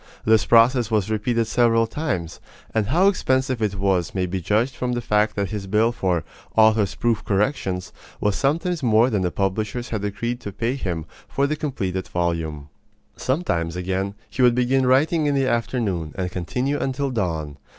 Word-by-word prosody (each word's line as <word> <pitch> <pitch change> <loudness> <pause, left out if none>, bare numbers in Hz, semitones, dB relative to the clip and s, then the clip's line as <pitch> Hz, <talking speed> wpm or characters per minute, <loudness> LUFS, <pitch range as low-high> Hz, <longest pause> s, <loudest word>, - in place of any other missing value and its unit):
This 110 -1 +4
process 120 0 +5
was 110 -2 0
repeated 115 +2 0
several 115 -1 +3
times; 115 - -3 0.3
and 110 -2 +1
how 175 - +3
expensive 130 - +1
it 105 -2 0
was 95 -3 0
may 95 -1 +1
be 90 +1 -3
judged 110 +9 +1
from 125 -1 -2
the 120 - -1
fact 105 -2 +1
that 100 0 -2
his 105 -3 -4
bill 110 +4 +3
for 90 -8 -1 0.3
"author's 110 -2 +4
proof 115 -1 0
corrections" 100 -3 -1 0.3
was 105 -1 +1
sometimes 165 +4 0
more 120 0 +4
than 105 -3 +1
the 90 - +1
publishers 105 +6 -2
had 110 -3 -3
agreed 115 +4 -3
to 100 - -7
pay 115 +5 -1
him 90 - -3 0.2
for 140 - 0
the 150 +2 0
completed 95 - -3
volume. 80 -4 -2 0.5
Sometimes, 85 - -1
again, 95 +2 -2
he 130 - -3
would 125 -1 +5
begin 125 +1 +2
writing 150 +4 +3
in 145 - +1
the 135 -1 +2
afternoon, 110 - -1
and 90 -2 -3
continue 125 - -2
until 135 +1 -1
dawn. 80 - -2
110 Hz, 175 wpm, -23 LUFS, 95-125 Hz, 0.5 s, process